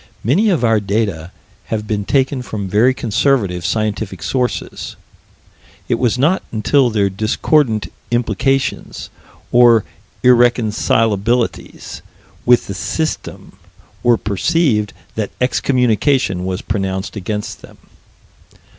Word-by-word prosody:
Many 180 - +3
of 170 -9 +1
our 115 -2 +3
data 100 -5 -2 0.3
have 110 -1 -3
been 105 -2 -2
taken 135 +1 +1
from 105 -5 -5
very 110 +7 +3
conservative 115 -7 0
scientific 105 -3 -2
sources: 125 -2 -3 0.9
it - - 0
was 125 -1 +1
not 155 +9 +2
until 125 +4 +2
their 105 -3 +1
discordant 110 +4 0 0.2
implications, 125 +3 -1 0.4
or 120 -3 +5 0.4
irreconcilabilities 115 -2 +1 0.5
with 125 0 +5
the 100 - -5
System, 155 - -4 0.4
were 120 -1 +4
perceived, 105 - 0 0.2
that 110 -2 -3
excommunication 125 -5 +1
was 95 +1 -3
pronounced 95 -1 -3
against 105 +1 -4
them. - - -15
115 Hz, 100 wpm, -17 LUFS, 100-125 Hz, 0.9 s, or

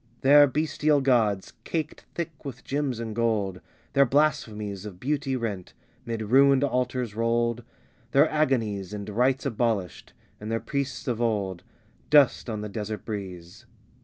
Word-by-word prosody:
Their 145 +2 +7
bestial 150 +1 +1
gods, 115 -8 +1
caked 155 -2 -4
thick 165 -3 -5
with 130 -2 -8
gems 135 -4 -2
and 110 -2 -5
gold, 105 -5 0 0.3
Their 140 -1 +5
blasphemies 110 -8 0
Of 100 -4 -9
beauty, 140 - -1
rent; 105 -7 -4 0.3
'mid 115 -1 -3
ruined 135 +4 +5
altars 125 -4 -1
rolled; 115 +1 0 0.5
Their 140 +5 +5
agonies 115 - 0
And 100 -1 -6
rites 125 +6 +1
abolished; 115 - -2 0.3
and 105 +1 -6
their 115 - 0
priests 140 -1 -4
of 120 -2 -1
old 100 -6 -1 0.5
Dust 145 -4 +4
on 110 -2 -3
the 105 - -4
desert 105 +1 -5
breeze. 95 0 -7
120 Hz, 140 wpm, -26 LUFS, 105-140 Hz, 0.5 s, Their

